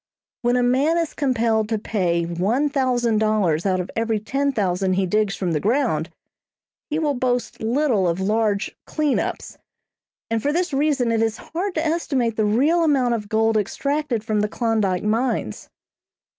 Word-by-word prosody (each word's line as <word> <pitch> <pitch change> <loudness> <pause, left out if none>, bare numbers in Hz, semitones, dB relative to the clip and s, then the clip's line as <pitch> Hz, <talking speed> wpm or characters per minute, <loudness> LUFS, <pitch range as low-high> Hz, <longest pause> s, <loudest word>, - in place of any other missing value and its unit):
When 240 0 +2
a 245 - +2
man 270 +7 +2
is 335 -2 -1
compelled 230 -6 +1
to 225 - 0
pay 180 -6 0
one 200 - 0
thousand 245 -5 +1
dollars 205 -6 +1
out 185 -1 +1
of 180 - -4
every 225 -1 0
ten 275 +6 -1
thousand 190 -5 0
he 190 +1 +1
digs 210 +2 0
from 180 -3 -2
the 155 - 0
ground, 210 - 0 0.8
he 300 - -1
will 305 -3 +1
boast 245 -2 -2
little 230 -4 +1
of 170 +1 -1
large 210 +1 0
"clean 300 -3 0
ups"; - - -5 0.7
and 225 -1 +1
for 290 - 0
this 350 0 -1
reason 275 -4 +1
it 225 -1 +1
is 225 -1 0
hard 365 +3 -4
to 315 - 0
estimate 275 -8 0
the 215 - +1
real 285 +11 +3
amount 265 -6 +2
of 210 -3 -4
gold 220 0 +2
extracted 275 +3 -1
from 215 -1 0
the 210 0 0
Klondyke 215 -6 0
mines. 220 - -1
225 Hz, 170 wpm, -22 LUFS, 210-275 Hz, 0.8 s, real